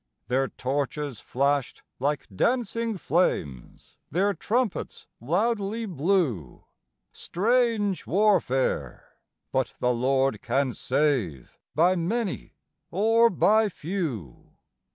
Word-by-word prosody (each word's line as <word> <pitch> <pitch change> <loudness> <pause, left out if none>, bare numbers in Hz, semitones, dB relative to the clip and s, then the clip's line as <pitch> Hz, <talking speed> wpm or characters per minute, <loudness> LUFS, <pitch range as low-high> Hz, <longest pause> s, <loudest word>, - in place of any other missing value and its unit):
Their 135 +2 +2
torches 140 0 -3
flashed 140 +1 -1 0.2
like 145 +3 -1
dancing 230 - 0
flames, 75 - -2
their 195 +6 +1
trumpets 220 +5 -2
loudly 205 - 0
blew; 155 - -1 0.5
Strange 220 -1 0
warfare! 190 -10 +1 0.3
but - - -1
the 125 0 +1
Lord 135 +2 +1
can 130 +2 0
save 125 - -1 0.2
by 175 +4 +4
many 195 +4 -2 0.3
or 225 +5 +4
by 215 +2 +3
few. 150 - -5
170 Hz, 90 wpm, -26 LUFS, 135-210 Hz, 0.5 s, by